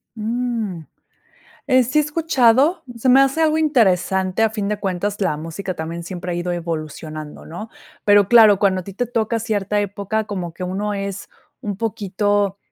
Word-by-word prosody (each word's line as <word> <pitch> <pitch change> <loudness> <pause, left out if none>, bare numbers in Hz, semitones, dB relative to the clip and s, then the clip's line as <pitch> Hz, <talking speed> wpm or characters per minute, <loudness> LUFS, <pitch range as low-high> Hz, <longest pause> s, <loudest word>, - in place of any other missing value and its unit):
Ujú. 225 -6 -3 0.8
eh, 255 -2 +5
sí, 260 +6 0
he - - +5
escuchado. 295 -1 +3
Se 255 +3 -1
me 260 +2 +7
hace 275 +3 +2
algo 315 0 +3
interesante, 190 - +2
a 225 - +3
fin 210 -2 -3
de 210 0 -1
cuentas, 200 +1 -2
la 170 -6 +1
música 170 +4 -5
también 165 +1 -5
siempre 180 0 -5
ha - - -2
ido 175 +1 -2
evolucionando, 155 -2 -6
¿no? 195 +7 -7 0.4
Pero 205 -1 +5
claro, 220 -4 +7
cuando 190 -2 +2
a 180 - -11
ti 195 - -8
te 245 +5 -1
toca 230 -1 -1
cierta 210 -2 -1
época, 205 +2 -2
como 185 -5 -5
que 180 - -9
uno 200 +3 -2
es 200 0 -5 0.3
un 205 -2 -4
poquito 205 -2 -1
205 Hz, 175 wpm, -20 LUFS, 185-230 Hz, 0.8 s, me